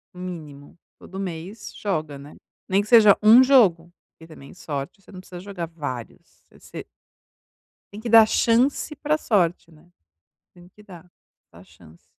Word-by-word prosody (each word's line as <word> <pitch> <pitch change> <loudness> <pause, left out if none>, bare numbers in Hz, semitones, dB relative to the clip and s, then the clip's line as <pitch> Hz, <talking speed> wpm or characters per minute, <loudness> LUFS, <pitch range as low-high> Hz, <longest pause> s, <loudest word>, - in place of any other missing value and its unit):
Mínimo, 160 -6 -10 0.2
todo 190 - -11
mês 190 +3 -8
joga, 155 -8 -4
né. 145 +2 -14 0.3
Nem 195 +1 +1
que 205 - -10
seja 215 -3 +6
um 225 +4 +7
jogo, 190 -11 +3 0.2
porque 160 - -17
também 150 -4 -14
sorte, 145 +1 -7
você - - -19
não 185 - -11
precisa 180 -1 -12
jogar 185 -3 -7
vários, 145 -8 -9
você - - -12 1.1
Tem 205 - -9
que 230 +2 -6
dar 225 -1 +7
chance 245 +7 0
para 300 +2 -1
sorte, 180 - -1
né, 165 +1 -22 0.7
tem 175 0 -18
que 210 +3 -21
dar. 180 -5 -15 0.5
Dar 85 - -16
chance. 85 -2 -21
180 Hz, 155 wpm, -22 LUFS, 155-210 Hz, 1.1 s, um